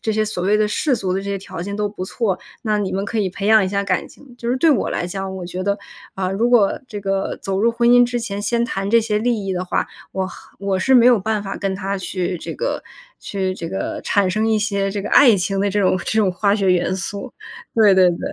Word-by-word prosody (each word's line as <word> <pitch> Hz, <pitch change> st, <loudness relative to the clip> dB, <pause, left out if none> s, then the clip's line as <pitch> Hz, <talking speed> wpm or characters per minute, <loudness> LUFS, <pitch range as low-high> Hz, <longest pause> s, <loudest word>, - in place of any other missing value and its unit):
这 220 Hz, -, -1 dB
些 215 Hz, 0 st, +1 dB
所 210 Hz, -4 st, -4 dB
谓 205 Hz, +3 st, +3 dB
的 215 Hz, -, +2 dB
世 250 Hz, +5 st, 0 dB
俗 185 Hz, -2 st, -2 dB
的 190 Hz, -, -1 dB
这 -, -, -10 dB
些 200 Hz, -, -2 dB
条 175 Hz, -3 st, -7 dB
件 200 Hz, +2 st, -5 dB
都 210 Hz, 0 st, 0 dB
不 200 Hz, -2 st, -6 dB
错， 200 Hz, -1 st, -1 dB, 0.3 s
那 215 Hz, -2 st, 0 dB
你 200 Hz, -2 st, -1 dB
们 195 Hz, +1 st, -1 dB
可 215 Hz, +3 st, -4 dB
以 190 Hz, -3 st, 0 dB
培 200 Hz, +2 st, -4 dB
养 220 Hz, -2 st, +6 dB
一 185 Hz, -, -1 dB
下 200 Hz, 0 st, -1 dB
感 185 Hz, -3 st, -1 dB
情。 265 Hz, -4 st, -17 dB
就 235 Hz, 0 st, -3 dB
是 255 Hz, -, +1 dB
对 325 Hz, +5 st, +3 dB
我 240 Hz, -, 0 dB
来 175 Hz, -, -2 dB
讲， 190 Hz, +1 st, -5 dB
我 180 Hz, -2 st, -6 dB
觉 185 Hz, +1 st, -5 dB
得， 200 Hz, +1 st, 0 dB, 0.4 s
啊， 190 Hz, -1 st, -2 dB
如 230 Hz, +5 st, +1 dB
果 225 Hz, -5 st, +3 dB
这 205 Hz, -, -6 dB
个 195 Hz, 0 st, -2 dB
走 195 Hz, 0 st, -3 dB
入 230 Hz, +2 st, +4 dB
婚 235 Hz, +1 st, +1 dB
姻 245 Hz, 0 st, +7 dB
之 245 Hz, 0 st, -2 dB
前， 205 Hz, -3 st, -4 dB
先 235 Hz, +3 st, +1 dB
谈 195 Hz, -3 st, -3 dB
这 230 Hz, +1 st, +5 dB
些 215 Hz, -1 st, -1 dB
利 225 Hz, -4 st, 0 dB
益 190 Hz, -, -1 dB
的 180 Hz, 0 st, -2 dB
话， 180 Hz, -, -1 dB, 0.2 s
我 190 Hz, 0 st, -2 dB
和 190 Hz, -, -13 dB
我 195 Hz, -1 st, -1 dB
是 265 Hz, -, +2 dB
没 240 Hz, 0 st, +6 dB
有 240 Hz, -5 st, +5 dB
办 220 Hz, +1 st, -1 dB
法 195 Hz, -1 st, -5 dB
跟 195 Hz, -1 st, -2 dB
他 195 Hz, 0 st, -3 dB
去 180 Hz, -1 st, -3 dB
这 -, -, -6 dB
个 -, -, -2 dB, 0.4 s
去 190 Hz, -2 st, -2 dB
这 165 Hz, -2 st, -6 dB
个， 195 Hz, -, -4 dB
产 200 Hz, -2 st, +2 dB
生 215 Hz, +4 st, 0 dB
一 220 Hz, -1 st, +2 dB
些 200 Hz, -2 st, 0 dB
这 200 Hz, +1 st, -3 dB
个 205 Hz, -, -5 dB
爱 240 Hz, -7 st, +7 dB
情 195 Hz, +2 st, -1 dB
的 200 Hz, 0 st, +1 dB
这 205 Hz, +1 st, 0 dB
种 185 Hz, -1 st, +3 dB
这 220 Hz, +5 st, -2 dB
种 195 Hz, -4 st, +3 dB
化 200 Hz, +3 st, +1 dB
学 190 Hz, -3 st, +3 dB
元 180 Hz, +1 st, +1 dB
素， 200 Hz, +7 st, -5 dB, 0.4 s
对 210 Hz, -4 st, +5 dB
对 185 Hz, -1 st, +5 dB
对。 170 Hz, -, -4 dB
200 Hz, 295 characters per minute, -20 LUFS, 190-220 Hz, 0.4 s, 姻